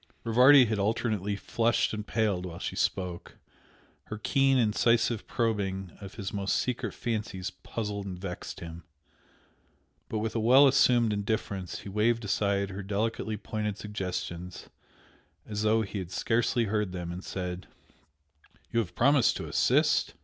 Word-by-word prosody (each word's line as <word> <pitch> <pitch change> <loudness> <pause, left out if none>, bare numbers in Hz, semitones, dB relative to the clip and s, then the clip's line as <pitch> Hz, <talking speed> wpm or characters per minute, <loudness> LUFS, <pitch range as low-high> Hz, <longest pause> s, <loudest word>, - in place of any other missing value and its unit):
Rivardi 125 +4 +7
had 110 -2 -1
alternately 105 -1 0
flushed 115 +3 0
and 105 -1 -5
paled 105 -5 0
while 85 -1 -8
she - - -4
spoke, 90 -2 -2 0.7
her 110 - -6
keen, 135 +4 +2
incisive 115 0 +2
probing 95 -6 -1
of 100 0 -9
his 100 -1 -5
most 100 -1 0
secret 125 -1 -2
fancies 105 -5 -3
puzzled 105 -3 -5
and 90 -2 -5
vexed 90 -1 -7
him, 85 0 -8 1.3
but 110 - -2
with 110 +1 -2
a - - +1
well 130 +5 +7
assumed 120 -4 +4
indifference 100 -3 -3
he - - -8
waved 110 +3 +1
aside 100 -1 0
her 95 +2 -5
delicately 105 +2 -2
pointed 105 -1 -3
suggestions 90 -4 -5 0.8
as 105 -1 -4
though 110 +1 +3
he 100 0 -5
had 90 -3 -6
scarcely 115 +4 +1
heard 105 -3 -1
them, 90 -2 -4
and 90 +2 -7
said 90 -1 -5 1.0
"You 115 - +2
have 105 -7 -3
promised 140 0 +4
to - - -6
assist? - - +2
105 Hz, 145 wpm, -29 LUFS, 95-115 Hz, 1.3 s, Rivardi